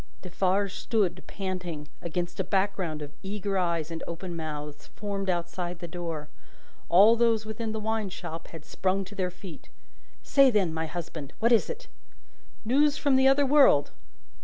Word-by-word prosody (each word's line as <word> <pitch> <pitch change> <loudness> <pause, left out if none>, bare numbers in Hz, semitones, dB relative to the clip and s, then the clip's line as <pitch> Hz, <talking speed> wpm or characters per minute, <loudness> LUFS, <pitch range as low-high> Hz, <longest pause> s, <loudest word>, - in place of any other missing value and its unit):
Defarge 190 +2 0
stood, 195 -6 0
panting, 180 -6 -4
against 175 +1 -3
a - - +2
background 185 -5 -1
of 145 - -8
eager 200 0 -3
eyes 170 -3 0
and 165 0 -5
open 170 +1 -5
mouths, 150 -2 -6
formed 200 -2 -3
outside 175 0 -2
the 175 - -7
door; 165 -3 -5 0.6
all 200 +7 +7
those 230 -2 +2
within 220 +1 -4
the 220 - -3
wine 220 -1 -1
shop 165 -2 -7
had 160 -2 -11
sprung 190 +1 -1
to 190 - -11
their 185 -3 -1
feet. 180 -3 -11 0.5
"Say 275 -1 +5
then, 195 -8 +2
my 160 0 -2
husband. 160 -3 -6
What 235 +2 +2
is 230 - +4
it?" 485 +1 -6 0.8
"News 285 +5 +3
from 280 -2 +2
the 265 0 +5
other 275 +1 +5
world!" 270 - +5
185 Hz, 160 wpm, -28 LUFS, 170-215 Hz, 0.8 s, all